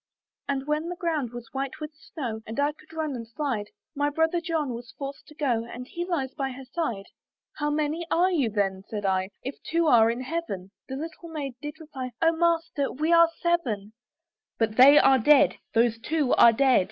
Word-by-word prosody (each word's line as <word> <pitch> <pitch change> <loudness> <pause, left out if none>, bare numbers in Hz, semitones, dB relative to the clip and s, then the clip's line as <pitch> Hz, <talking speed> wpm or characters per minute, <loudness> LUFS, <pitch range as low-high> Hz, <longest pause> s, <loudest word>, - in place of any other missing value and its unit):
"And 275 -1 -1
when 305 +3 -1
the 355 - -4
ground 320 -8 -1
was 240 -1 -9
white 275 +2 -4
with 305 0 -6
snow, 255 -7 -6
"And 225 +5 -5
I 290 +1 +2
could 310 +1 -20
run 315 -3 -3
and 230 -2 -7
slide, 235 -4 -3 0.3
"My 290 -1 +1
brother 320 +3 +1
John 320 -6 -1
was 235 0 -9
forced 275 0 -7
to 300 - -15
go, 250 -7 0
"And 250 +2 -8
he 345 +4 -4
lies 280 -8 -2
by 270 -3 -3
her 265 +1 -10
side." 250 - -3 0.5
"How 295 -1 0
many 305 +3 -1
are 360 +3 +3
you 285 -10 +1
then," 195 -2 -1
said 205 -2 -4
I, 190 0 +1
"If 265 +2 -6
they 330 - -4
two 335 - +4
are 230 -6 +6
in 235 +2 -2
Heaven?" 260 - -4 0.2
The 265 - -4
little 330 +3 -7
Maiden 285 -5 -5
did 295 +1 -7
reply, 265 -6 -7
"O 330 0 +4
Master! 330 -4 +1
we 310 +5 0
are 335 0 +7
seven." 235 - 0 0.6
"But 225 -1 0
they 275 +4 +9
are 265 -2 +6
dead; 290 +5 +5 0.2
those 230 0 +3
two 295 +1 0
are 235 - +8
dead! 260 +2 +4
280 Hz, 205 wpm, -26 LUFS, 235-320 Hz, 0.6 s, they